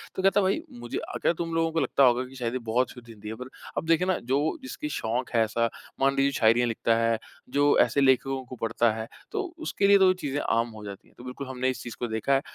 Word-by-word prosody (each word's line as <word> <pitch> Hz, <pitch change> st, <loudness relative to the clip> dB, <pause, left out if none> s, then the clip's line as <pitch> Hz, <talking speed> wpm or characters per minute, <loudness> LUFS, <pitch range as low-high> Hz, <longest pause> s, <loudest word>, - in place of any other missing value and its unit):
तो 190 Hz, -, -3 dB
कहता 195 Hz, +1 st, +4 dB
भाई 195 Hz, +11 st, +1 dB, 0.2 s
मुझे -, -, -5 dB, 0.2 s
अगर -, -, +1 dB
तुम 165 Hz, -1 st, -3 dB
लोगों 165 Hz, 0 st, +1 dB
को 165 Hz, -, 0 dB
लगता 140 Hz, -, +2 dB
होगा 125 Hz, 0 st, +4 dB
कि 130 Hz, +1 st, -13 dB
शायद 120 Hz, -2 st, -3 dB
ये 130 Hz, -, -1 dB
बहुत 120 Hz, +2 st, 0 dB
शुद्ध 120 Hz, -2 st, -13 dB
हिंदी 105 Hz, -2 st, -11 dB
है 110 Hz, -, -5 dB
पर 125 Hz, +2 st, -8 dB, 0.3 s
अब -, -, -1 dB
देखिए 165 Hz, +2 st, +3 dB
ना 185 Hz, -, +2 dB
जो 140 Hz, -, 0 dB
जिसकी 300 Hz, +3 st, -5 dB
शौक 120 Hz, -, -2 dB
है 115 Hz, -, +5 dB
ऐसा, 115 Hz, +1 st, 0 dB, 0.3 s
मान 135 Hz, 0 st, +3 dB
लीजिए 140 Hz, 0 st, +3 dB
शायरियाँ 120 Hz, -1 st, +3 dB
लिखता 115 Hz, 0 st, +1 dB
है, 115 Hz, 0 st, +2 dB, 0.3 s
जो 145 Hz, +2 st, +3 dB
ऐसे 140 Hz, -, +3 dB
लेखकों 135 Hz, 0 st, +2 dB
को 130 Hz, -, -9 dB
पढ़ता 115 Hz, 0 st, +1 dB
है 110 Hz, 0 st, -5 dB, 0.2 s
तो 425 Hz, -, -1 dB, 0.2 s
उसके 260 Hz, -10 st, 0 dB
लिए 200 Hz, -, +7 dB
तो 190 Hz, -, +5 dB
वो 185 Hz, -, +5 dB
चीज़ें 145 Hz, -6 st, -3 dB
आम 115 Hz, +1 st, +1 dB
हो 110 Hz, -2 st, -11 dB
जाती 100 Hz, -1 st, -9 dB
है। -, -, -25 dB
तो 120 Hz, -, -12 dB
बिल्कुल 130 Hz, +2 st, -7 dB
हमने 130 Hz, 0 st, -1 dB
इस 130 Hz, -, -4 dB
चीज़ 120 Hz, -, -7 dB
को 120 Hz, -, -1 dB
देखा 110 Hz, +4 st, 0 dB
है, 135 Hz, -, +3 dB
130 Hz, 265 wpm, -27 LUFS, 115-150 Hz, 0.3 s, लिए